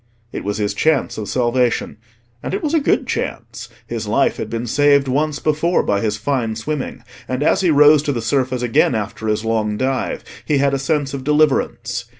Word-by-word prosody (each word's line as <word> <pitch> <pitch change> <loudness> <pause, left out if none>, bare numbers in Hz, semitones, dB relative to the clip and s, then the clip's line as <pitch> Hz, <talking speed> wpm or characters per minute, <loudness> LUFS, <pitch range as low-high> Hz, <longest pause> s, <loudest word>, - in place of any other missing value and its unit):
It - - -5
was 105 +1 -2
his 105 -2 -1
chance 150 +1 +1
of 105 - -5
salvation; 125 -2 0 0.4
and - - -3
it 400 - -4
was 305 0 -1
a 325 - +4
good 280 - +1
chance. - - -5 0.2
His 115 -2 -5
life 135 +6 +1
had - - -5
been 115 +1 -3
saved 140 +2 +3
once 145 +3 0
before 155 +4 +1
by 100 0 0
his 105 -2 -1
fine 115 -1 -1
swimming, 140 +5 -4 0.2
and 130 +2 -2
as - - +2
he 180 - +2
rose 150 0 +6
to 145 - -1
the 125 - -2
surface 130 +1 -1
again 120 0 +2
after 110 +1 -4
his 105 +1 -1
long 110 -2 0
dive 130 +1 -2 0.2
he 150 - +1
had 140 0 +2
a 135 - 0
sense 145 0 -1
of 135 -1 -5
deliverance. 150 0 +1
130 Hz, 200 wpm, -19 LUFS, 115-150 Hz, 0.4 s, rose